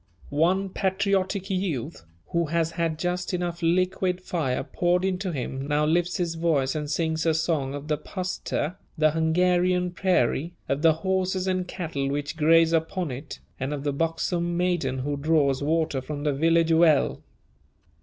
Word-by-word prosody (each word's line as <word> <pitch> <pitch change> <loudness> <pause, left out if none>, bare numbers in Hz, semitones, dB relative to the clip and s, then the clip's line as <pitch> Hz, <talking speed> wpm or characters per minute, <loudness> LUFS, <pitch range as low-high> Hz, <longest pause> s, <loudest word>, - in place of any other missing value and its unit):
One 180 +6 +2
patriotic 195 0 0
youth, 165 - -3 0.2
who 170 -1 0
has 165 +1 0
had 165 -2 -1
just 180 +2 -2
enough 175 -1 -3
liquid 185 +2 +1
fire 160 -8 -2
poured 180 +1 +1
into 190 0 -1
him, 135 -1 -4
now 150 +1 +2
lifts 175 +4 +1
his 175 -3 -1
voice 160 -5 +1
and 150 -1 -3
sings 160 +1 0
a 160 -1 +2
song 155 -4 0
of 145 +1 -7
the 150 -2 0
puszta 185 -2 -3 0.2
(the 155 0 +4
Hungarian 180 +3 +2
prairie), 175 -3 +1
of 140 +1 -1
the 165 -1 +6
horses 190 0 0
and 185 -1 -1
cattle 160 -7 -3
which 145 +2 -3
graze 165 +1 +4
upon 165 0 0
it, 140 +4 -7 0.2
and 135 +3 -2
of 140 - -6
the 145 -1 -1
buxom 170 +3 -1
maiden 175 -7 0
who 145 +2 -2
draws 140 -2 +2
water 155 -2 0
from 145 +2 -5
the 150 -2 +1
village 165 +3 +3
well. 160 -3 +4
165 Hz, 160 wpm, -26 LUFS, 150-180 Hz, 0.2 s, the